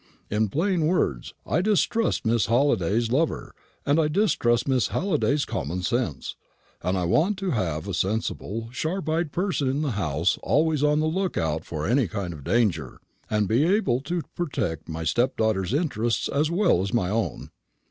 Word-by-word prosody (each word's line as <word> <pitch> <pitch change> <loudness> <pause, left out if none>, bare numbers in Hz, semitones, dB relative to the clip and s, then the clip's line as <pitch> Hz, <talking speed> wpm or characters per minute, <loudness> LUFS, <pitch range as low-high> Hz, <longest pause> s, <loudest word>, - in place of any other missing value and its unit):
In 105 0 +1
plain 170 - +1
words, 70 - -1
I 160 - +1
distrust 215 - +1
Miss 115 -2 +2
Halliday's 115 -3 +2
lover, 155 +5 0 0.3
and 145 +3 +3
I 155 - +3
distrust 150 - +1
Miss 130 -6 +2
Halliday's 150 -5 0
common 90 +5 -3
sense; 90 - -2 0.5
and 95 +1 0
I 90 - 0
want 165 - +2
to 190 -1 -2
have 85 - -2
a 100 - -3
sensible, 110 +3 -2
sharp 165 +7 -3
eyed 160 -1 0
person 175 -6 -1
in 140 +4 -1
the 145 - -1
house 85 -4 0
always 155 -1 +2
on 150 +1 +3
the - - +1
look 185 +3 -1
out 80 -1 -1
for 80 -2 -4
any 125 -1 +2
kind 90 -1 -4
of 75 -3 -10
danger, 85 - 0 0.3
and 105 -1 0
able 145 - +2
to 170 +3 -3
protect 85 - -3
my 80 0 -4
stepdaughter's 110 0 +1
interests 120 -7 0
as 150 +2 +1
well 170 - +3
as 95 - -3
my 105 -6 0
own." 115 +1 -2
120 Hz, 170 wpm, -25 LUFS, 95-155 Hz, 0.5 s, and